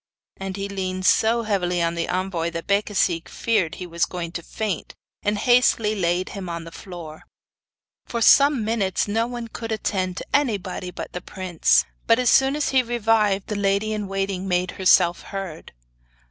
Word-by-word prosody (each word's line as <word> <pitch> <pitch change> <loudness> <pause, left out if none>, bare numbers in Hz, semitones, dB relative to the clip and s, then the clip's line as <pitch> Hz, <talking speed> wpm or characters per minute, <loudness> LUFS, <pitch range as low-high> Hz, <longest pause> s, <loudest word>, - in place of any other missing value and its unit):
And 195 0 -5
he 200 0 -3
leaned 185 -1 -3
so 225 +3 +3
heavily 180 -5 0
on 170 0 +1
the 170 -1 -2
envoy 180 -2 -1
that 170 0 -6
Becasigue 200 -4 +1
feared 205 -8 0
he 180 - -7
was 170 -1 0
going 170 -2 -5
to 170 - -5
faint, 205 +1 -4 0.3
and 205 0 0
hastily 235 -2 +3
laid 180 -2 0
him 195 -3 -6
on 170 -1 -4
the 165 - -10
floor. 165 -4 -9 0.9
For 235 - -3
some 275 0 +5
minutes 210 -5 0
no 225 +3 0
one 240 -1 -5
could 225 0 -7
attend 190 -4 -2
to - - -5
anybody 205 -10 0
but - - -8
the 180 - -5
prince; 185 -4 +1 0.2
but 230 - +5
as 250 -1 +3
soon 270 +1 +4
as 300 - 0
he 265 -1 +4
revived 225 -4 +1
the 210 - -4
lady 200 +2 +1
in 210 -2 -3
waiting 195 -1 -2
made 180 0 0
herself 180 -2 +3
heard. 190 -5 -7
195 Hz, 175 wpm, -23 LUFS, 180-220 Hz, 0.9 s, some